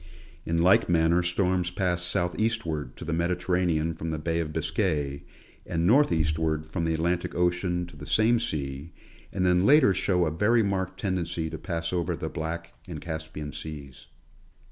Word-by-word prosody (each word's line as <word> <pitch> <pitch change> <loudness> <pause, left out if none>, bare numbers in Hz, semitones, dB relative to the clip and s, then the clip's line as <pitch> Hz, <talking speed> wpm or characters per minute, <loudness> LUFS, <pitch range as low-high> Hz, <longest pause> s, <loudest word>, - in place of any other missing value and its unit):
In 85 0 +1
like 95 0 +5
manner 85 +1 +3
storms 90 0 +1
pass 90 -1 -1
southeastward 90 - -1
to - - -8
the - - -2
Mediterranean 85 -1 0
from 80 +1 -5
the 80 - -2
Bay 80 +2 -1
of 80 -2 -2
Biscay, 75 -3 -1 0.4
and 85 0 -1
northeastward 80 - +2
from 80 +2 -3
the 80 - +1
Atlantic 85 +2 -1
ocean 90 0 0
to 85 -1 -14
the 75 +1 -10
same 115 +2 +3
sea, 70 - -4 0.4
and 90 - -1
then 90 0 +4
later 135 -3 +6
show 90 -1 +1
a 80 - 0
very 110 +8 +3
marked 95 -2 -2
tendency 85 -4 -2
to 80 - -5
pass 85 -1 -3
over 85 -1 0
the 80 - -4
Black 85 +1 -5
and - - -6
Caspian 80 -2 -6
seas. 70 -2 -8
85 Hz, 165 wpm, -27 LUFS, 80-90 Hz, 0.4 s, later